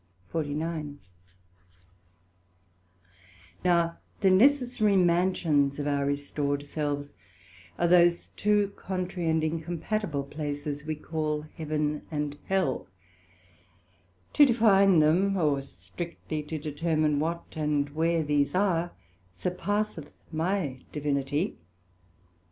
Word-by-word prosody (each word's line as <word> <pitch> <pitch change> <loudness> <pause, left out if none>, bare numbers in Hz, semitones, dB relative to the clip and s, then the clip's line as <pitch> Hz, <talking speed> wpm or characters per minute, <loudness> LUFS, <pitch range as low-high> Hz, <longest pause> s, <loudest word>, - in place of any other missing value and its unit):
SECT.49 155 -1 -3 2.7
Now, 170 -1 +2 0.2
the 190 -2 +5
necessary 245 -1 +4
Mansions 170 -5 +2
of 145 - -3
our 140 -1 0
restored 145 0 -2
selves, 145 -1 -3 0.6
are 170 - +2
those 175 0 +4
two 205 -1 +1
contrary 180 -2 -3
and 160 0 +2
incompatible 165 +1 -2
places 145 0 -5
we 155 - -1
call 150 -1 -2
Heaven 150 -2 -1
and 150 -2 -2
Hell; 190 -9 0 1.5
to 295 - +7
define 205 -7 +5
them, 185 +6 +3
or 150 -5 +2
strictly 150 - -6
to 150 +2 -5
determine 155 0 0
what 170 +2 -1
and 150 -2 0
where 165 +2 +1
these 145 0 +1
are, 175 -3 +1 0.4
surpasseth 180 - -2 0.2
my 160 -4 -1
Divinity. 145 +3 -1
160 Hz, 95 wpm, -28 LUFS, 145-180 Hz, 2.7 s, to